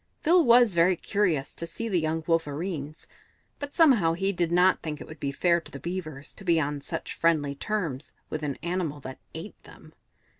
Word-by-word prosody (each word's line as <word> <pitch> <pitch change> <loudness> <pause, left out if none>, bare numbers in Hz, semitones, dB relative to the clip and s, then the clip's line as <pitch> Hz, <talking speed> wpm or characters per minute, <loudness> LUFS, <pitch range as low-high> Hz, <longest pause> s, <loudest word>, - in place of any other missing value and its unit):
Phil 345 +2 +5
was 240 -4 +6
very 170 +2 +4
curious 170 -7 0
to 170 - -6
see 230 +8 -5
the 190 -5 +1
young 160 0 -1
Wolverenes, 155 -1 -2 0.5
but 285 -1 -6
somehow 245 - +5
he 195 +3 0
did 175 -3 0
not 180 +2 +4
think 150 -2 -5
it - - -8
would 155 -1 -11
be 140 - -2
fair 170 +4 +2
to - - -10
the 140 - -8
Beavers 155 -3 -6
to 195 - -13
be 170 -3 +3
on 145 -1 -2
such - - -5
friendly 155 -4 +1
terms 160 -5 -3 0.2
with 155 - -4
an 145 -3 -3
animal 170 -4 -2
that 130 -1 -8 0.2
ate - - -8
them. - - -16
165 Hz, 195 wpm, -27 LUFS, 150-190 Hz, 0.5 s, was